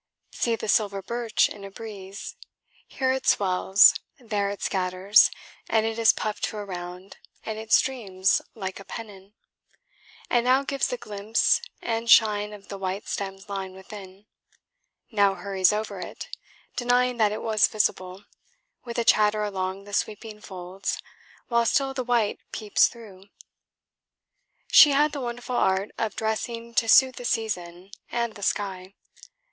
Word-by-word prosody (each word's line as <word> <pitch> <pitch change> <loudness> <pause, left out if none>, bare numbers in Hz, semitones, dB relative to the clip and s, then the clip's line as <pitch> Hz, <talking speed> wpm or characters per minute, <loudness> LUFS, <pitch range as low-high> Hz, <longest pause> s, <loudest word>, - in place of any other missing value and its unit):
See 230 -1 0
the 225 - -6
silver 200 -1 +1
birch 235 0 +1
in 205 - -10
a 195 - -7
breeze: 200 -2 -9 0.5
here 260 -1 -1
it 265 0 -4
swells, 190 +1 +5 0.2
there 210 -5 -2
it 200 - -6
scatters, 190 +2 +3 0.4
and 220 -1 +2
it 225 0 -3
is 225 - +6
puffed 215 -1 -4
to 215 - -6
a 205 - -5
round 180 0 -8 0.3
and 220 -1 -4
it 220 0 -9
streams 195 -8 +2
like 190 -3 -5
a - - -10
pennon, 205 -1 -10 0.9
and 240 -1 +2
now 260 +2 +3
gives 275 0 -1
the - - -3
glimpse 210 - +1 0.2
and 230 0 -2
shine 210 -2 +5
of 205 -1 -12
the 200 - -7
white 190 +2 -4
stem's 195 0 -5
line 195 -2 -5
within, 190 0 -12 0.9
now 200 -3 +3
hurries 195 -2 +2
over 215 +1 -3
it, - - -8 0.4
denying 245 0 +1
that 215 -3 +3
it 210 - -5
was 215 -2 +3
visible, 185 -3 -2 0.6
with 235 -2 -7
a 235 - +1
chatter 210 -1 +3
along 190 -1 -3
the 205 0 -13
sweeping 210 +1 -3
folds, 185 -1 -5 0.5
while 235 -1 +2
still 270 +3 +1
the 260 -1 -3
white 235 -4 0
peeps 210 -2 +2
through. 205 -6 -13 1.5
She 295 -3 +8
had 295 +2 +3
the 285 - -5
wonderful 245 0 -4
art 190 +2 +1
of 220 -1 -2
dressing 230 +1 -3
to 225 0 +1
suit 260 +2 +6
the - - -7
season 190 -6 -3 0.2
and 235 -2 -2
the 205 - -12
sky. 195 -1 -3
210 Hz, 150 wpm, -25 LUFS, 195-230 Hz, 1.5 s, She